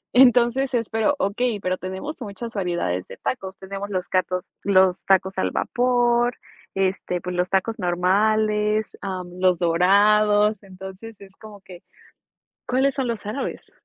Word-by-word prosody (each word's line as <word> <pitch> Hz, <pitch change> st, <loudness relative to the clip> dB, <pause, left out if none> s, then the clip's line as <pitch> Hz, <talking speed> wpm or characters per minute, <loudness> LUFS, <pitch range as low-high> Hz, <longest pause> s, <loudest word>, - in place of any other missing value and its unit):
Entonces 250 Hz, +1 st, +4 dB
es 230 Hz, -2 st, -1 dB
pero 225 Hz, +6 st, +1 dB
okey, 220 Hz, 0 st, -1 dB
pero 185 Hz, -1 st, -2 dB
tenemos 190 Hz, +11 st, -6 dB
muchas 225 Hz, +2 st, -7 dB
variedades 175 Hz, -, -2 dB
de -, -, -11 dB
tacos, 195 Hz, -6 st, -4 dB
tenemos 195 Hz, +1 st, -6 dB
los 185 Hz, -3 st, -3 dB
catos 185 Hz, 0 st, -1 dB
los 185 Hz, -2 st, +3 dB
tacos 190 Hz, 0 st, +2 dB
al 95 Hz, -, +1 dB
vapor, 240 Hz, -, +1 dB, 0.4 s
este, 190 Hz, -2 st, -1 dB
pues 180 Hz, +1 st, -5 dB
los 180 Hz, 0 st, 0 dB
tacos 195 Hz, +4 st, 0 dB
normales, 210 Hz, +4 st, +1 dB
am, 185 Hz, -2 st, -4 dB
los 185 Hz, -1 st, +3 dB
dorados, 205 Hz, +4 st, +3 dB
entonces 190 Hz, +3 st, -11 dB
es 195 Hz, -1 st, -15 dB
como 210 Hz, -2 st, -13 dB
que, 185 Hz, -2 st, -13 dB, 0.9 s
¿cuáles 265 Hz, +2 st, +1 dB
son 265 Hz, -2 st, -1 dB
los 230 Hz, -3 st, -4 dB
árabes? 215 Hz, +7 st, -5 dB
200 Hz, 145 wpm, -23 LUFS, 185-225 Hz, 0.9 s, Entonces